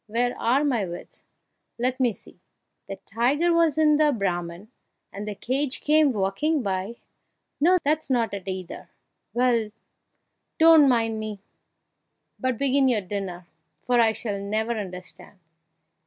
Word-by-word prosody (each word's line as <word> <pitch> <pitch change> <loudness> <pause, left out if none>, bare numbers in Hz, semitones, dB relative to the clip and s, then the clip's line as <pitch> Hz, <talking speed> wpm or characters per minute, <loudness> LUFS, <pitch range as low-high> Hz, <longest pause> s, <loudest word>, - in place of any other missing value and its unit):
where 240 +3 0
are 255 +5 +2
my 250 -8 +1
wits? 175 -2 -8 0.6
Let 255 +2 -1
me 250 -2 +3
see - - -14 0.5
the 195 - -4
tiger 275 +11 +1
was 330 -3 +2
in 305 -1 +4
the 300 -1 +3
Brahman, 180 -2 -3 0.4
and 205 +2 -6
the 210 - -4
cage 265 +5 -2
came 300 -1 +4
walking 240 +9 -1
by 195 +3 -3 0.6
no, 350 +5 +4
that's 305 +1 0
not 235 -5 0
it, 195 -1 -6
either! 185 -2 -6 0.4
Well, 240 -3 +1 0.9
don't 320 -3 +7
mind 225 -3 +1
me, 215 -2 -5 1.0
but 255 -3 -1
begin 275 +1 +2
your 235 -5 +2
dinner, 185 -2 -5 0.4
for 245 0 +2
I 225 -1 +4
shall 215 -2 -4
never 215 +3 -2
understand!" 185 -2 -7
235 Hz, 140 wpm, -24 LUFS, 200-280 Hz, 1.0 s, don't